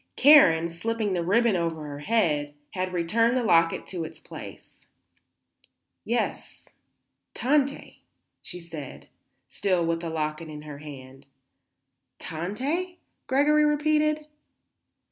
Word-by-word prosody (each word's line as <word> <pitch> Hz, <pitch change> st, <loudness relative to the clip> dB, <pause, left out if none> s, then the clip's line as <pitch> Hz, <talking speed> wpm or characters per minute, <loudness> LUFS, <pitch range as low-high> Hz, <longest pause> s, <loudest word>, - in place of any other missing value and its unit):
Karen, 215 Hz, -, +7 dB
slipping 210 Hz, +5 st, -2 dB
the 175 Hz, -2 st, -1 dB
ribbon 220 Hz, +4 st, +3 dB
over 165 Hz, -3 st, -2 dB
her 145 Hz, -1 st, -7 dB
head, 150 Hz, -6 st, 0 dB, 0.2 s
had 185 Hz, -1 st, -3 dB
returned 230 Hz, +8 st, +1 dB
the 250 Hz, -, 0 dB
locket 165 Hz, -6 st, +3 dB
to 175 Hz, -3 st, -5 dB
its 160 Hz, -, -8 dB
place. -, -, -12 dB, 1.2 s
"Yes; -, -, -3 dB, 0.7 s
Tante," 280 Hz, +1 st, 0 dB, 0.4 s
she 180 Hz, -, -9 dB
said, 165 Hz, -5 st, -10 dB, 0.4 s
still 180 Hz, +3 st, 0 dB
with 165 Hz, 0 st, 0 dB
the 165 Hz, -1 st, -5 dB
locket 155 Hz, 0 st, -3 dB
in 150 Hz, -1 st, -9 dB
her 150 Hz, -2 st, -9 dB
hand. 135 Hz, -2 st, -11 dB, 0.9 s
"Tante?" 265 Hz, -, -3 dB, 0.3 s
Gregory 295 Hz, +3 st, +3 dB
repeated. 300 Hz, 0 st, +1 dB
180 Hz, 110 wpm, -26 LUFS, 160-255 Hz, 1.2 s, Karen